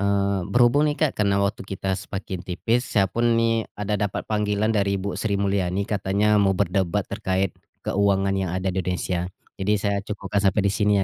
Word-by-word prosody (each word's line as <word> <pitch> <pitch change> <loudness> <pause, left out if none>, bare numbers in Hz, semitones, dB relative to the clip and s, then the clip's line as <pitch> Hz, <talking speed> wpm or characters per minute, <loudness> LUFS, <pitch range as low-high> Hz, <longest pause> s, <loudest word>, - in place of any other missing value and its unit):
Eee, 100 -2 +1
berhubung 125 +5 +4
nih, 145 - -1
Kak, 155 -3 +1
karena 100 -1 +3
waktu 100 +1 -2
kita 95 0 -2
semakin 95 -1 -5
tipis, 115 +7 -1
saya 100 -3 +3
pun 115 +4 +1
nih 115 -1 +1
ada 105 0 -2
dapat 100 -2 -2
panggilan 105 0 0
dari 100 -2 +1
Ibu 100 +1 -3
Sri 105 -3 0
Mulyani 100 -1 0
katanya 105 +1 +2
mau 95 -2 +2
berdebat 95 0 0
terkait 95 -1 -1 0.3
keuangan 100 -1 +2
yang 95 -2 -1
ada 95 0 -1
di 95 - 0
Indonesia. 90 -1 -2 0.3
Jadi 100 +2 +1
saya 100 0 0
cukupkan 105 0 -3
sampai 100 +1 +2
di 100 - +2
sini 105 0 +2
100 Hz, 185 wpm, -24 LUFS, 95-105 Hz, 0.3 s, berhubung